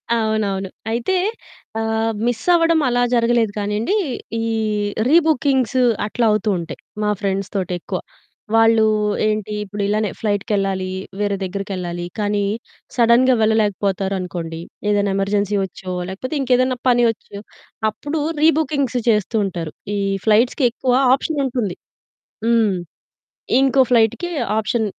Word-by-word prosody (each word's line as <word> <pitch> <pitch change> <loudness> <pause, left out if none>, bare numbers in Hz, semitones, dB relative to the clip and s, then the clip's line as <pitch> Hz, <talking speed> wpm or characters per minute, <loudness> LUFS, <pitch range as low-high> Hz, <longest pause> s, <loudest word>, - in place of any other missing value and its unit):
అవునవును. 215 -4 -1 0.2
అయితే 240 +12 0 0.6
ఆహ్, 225 0 0 0.2
మిస్ 240 -2 -1
అవ్వడం 330 -1 +4
అలా 245 0 +1
జరగలేదు 235 -2 +2
కానీయండి. 210 - -1 0.5
ఈ - - -1 0.6
రీబుకింగ్స్ 275 -5 +3 0.2
అట్లా 235 +2 0
అవుతూ 210 0 +1
ఉంటాయి. 170 -1 -6 0.2
మా 210 - +1
ఫ్రెండ్స్ 195 -1 -2
తోటెక్కువ, 180 -2 -2 0.6
వాళ్ళు 225 -1 +5 0.4
ఏంటి 215 0 -1
ఇప్పుడు 205 0 -6
ఇలానే 210 0 0
ఫ్లైట్‌‌కెళ్ళాలి, 195 -3 -1 0.3
వేరే 205 -1 0
దగ్గరికెళ్ళాలి. 185 -2 -4
కానీ 205 -1 0 0.5
సడెన్‌గా 245 +2 +5
వెళ్ళలేకపోతారనుకోండి 195 -6 -1 0.3
ఏదైనా 205 -1 +1
ఎమర్జెన్సీ 200 +1 0
వచ్చో, 185 0 -8 0.2
లేకపోతే 255 +10 -5
ఇంకేదైనా 255 -1 +2
పని 240 0 +4
వచ్చో, 205 -2 -6 0.5
అప్పుడు 290 +8 -4 0.2
రీ 315 - +7
బుకింగ్స్ 280 -5 0
చేస్తూ 210 +1 +1
ఉంటారు. 170 -5 -5 0.2
ఈ - - -1 0.3
ఫ్లైట్స్‌కి 235 +5 +3
ఎక్కువ 250 0 0 0.2
ఆప్షన్ 285 +2 -1
ఉంటుంది. 235 -8 -2 0.7
హ్మ్. 225 -4 +3 0.9
ఇంకో 270 0 +4
ఫ్లైట్‌కి 235 +9 +2 0.3
ఆప్షన్ 220 +2 0
215 Hz, 115 wpm, -20 LUFS, 195-245 Hz, 0.9 s, రీ